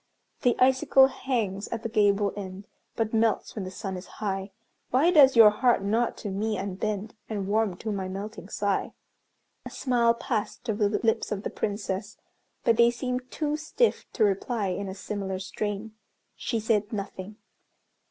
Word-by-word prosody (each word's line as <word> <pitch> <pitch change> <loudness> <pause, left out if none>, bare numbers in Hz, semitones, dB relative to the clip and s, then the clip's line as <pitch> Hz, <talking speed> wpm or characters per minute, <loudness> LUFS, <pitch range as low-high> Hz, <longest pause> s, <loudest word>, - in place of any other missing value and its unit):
The 245 -2 +3
icicle 265 +1 +5
hangs 215 -8 -2
at 230 -1 -5
the - - -1
gable 205 -2 +2
end, 195 -1 -7 0.3
But 225 -1 -1
melts 225 -1 +1
when 205 -4 -4
the - - -5
sun 190 0 -5
is 180 +1 -8
high, 195 -2 -2 0.4
Why 290 +8 +4
does 275 -6 +7
your 220 -2 +9
heart 235 -1 +2
not 225 +4 0
to 205 - -2
me 210 +2 -1
unbend, 200 +2 -3 0.2
And 205 -3 -2
warm 210 -3 +1
to 220 - -4
my 195 -2 -3
melting 195 +1 -7
sigh." 205 -2 -1 0.7
A - - -7
smile 235 -3 +2
passed 235 0 -3
over 205 -1 +1
the 215 - -2
lips 225 - +1
of 205 -1 -2
the - - -3
Princess, 200 0 -3 0.5
but 230 -1 +3
they 235 0 +6
seemed 250 +1 -3
too 300 -1 -1
stiff 320 +10 0
to 225 - +2
reply 205 +1 0
in 195 +2 -3
a 190 - -6
similar 195 -1 -4
strain. 205 +3 -4 0.4
She 230 - -2
said 215 -1 0
nothing. 200 -1 -5
210 Hz, 170 wpm, -27 LUFS, 195-235 Hz, 0.7 s, your